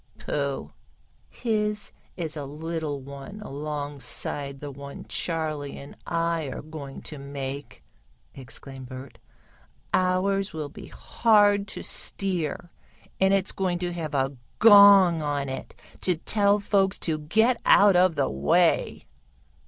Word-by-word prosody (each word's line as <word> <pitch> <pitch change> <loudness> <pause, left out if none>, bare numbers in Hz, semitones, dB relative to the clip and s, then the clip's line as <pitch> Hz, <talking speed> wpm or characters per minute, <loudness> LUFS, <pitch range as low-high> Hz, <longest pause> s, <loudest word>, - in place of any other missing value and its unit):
"Pooh! 140 -2 -3 0.6
His 210 -2 -2 0.3
is 160 -3 -3
a 145 -2 -5
little 155 0 -4
one 140 +9 -9
alongside 145 - -4
the 145 0 -7
one 140 +1 -9
Charley 155 -4 -3
and 140 - -11
I 165 -1 0
are 135 - -6
going 150 -3 -8
to 150 - -8
make!" 140 0 -7 0.5
exclaimed 130 0 -9
Bert. 130 +1 -10 0.7
"Ours 185 +1 +1
will 155 -2 -4
be - - -11
hard 205 -3 +3
to - - -7
steer, 175 -3 -2 0.5
and 190 0 +4
it's 195 -1 +2
going 185 -2 -1
to 175 0 -3
have 160 -4 -4
a 135 0 0 0.2
gong 200 -6 +8
on 145 -2 -2
it 130 0 -7 0.2
to 180 - +1
tell 200 +4 +2
folks 200 -1 +1
to 155 -2 -2
get 220 +11 +2
out 200 -2 +6
of 180 -2 +4
the 140 - +1
way." 70 +2 +1
160 Hz, 130 wpm, -26 LUFS, 140-195 Hz, 0.7 s, gong